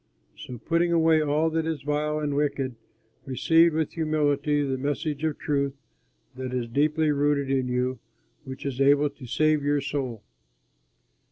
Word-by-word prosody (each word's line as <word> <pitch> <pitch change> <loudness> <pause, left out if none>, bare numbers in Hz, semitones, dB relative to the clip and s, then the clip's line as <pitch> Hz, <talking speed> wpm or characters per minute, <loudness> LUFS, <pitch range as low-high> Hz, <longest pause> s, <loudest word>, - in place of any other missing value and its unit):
So 125 - -8
putting 170 +7 0
away 160 -1 +4
all 155 +2 +1
that 160 0 -1
is 160 -4 -3
vile 150 +1 -1
and 150 -2 -2
wicked, 140 -3 -1 0.5
receive 165 +5 +3
with 160 -2 0
humility 150 -2 +1
the 135 -2 -2
message 145 +2 -2
of 155 -2 -1
truth 140 -2 -1 0.6
that 130 -1 -5
is 120 -2 -2
deeply 150 +5 +1
rooted 145 -1 +1
in 130 -1 0
you 125 0 -1 0.4
which 130 -1 -8
is 135 -1 -3
able 145 +1 +4
to 140 -3 -12
save 155 +4 +2
your 145 0 +2
soul. 135 -6 -4
145 Hz, 155 wpm, -26 LUFS, 135-155 Hz, 0.6 s, away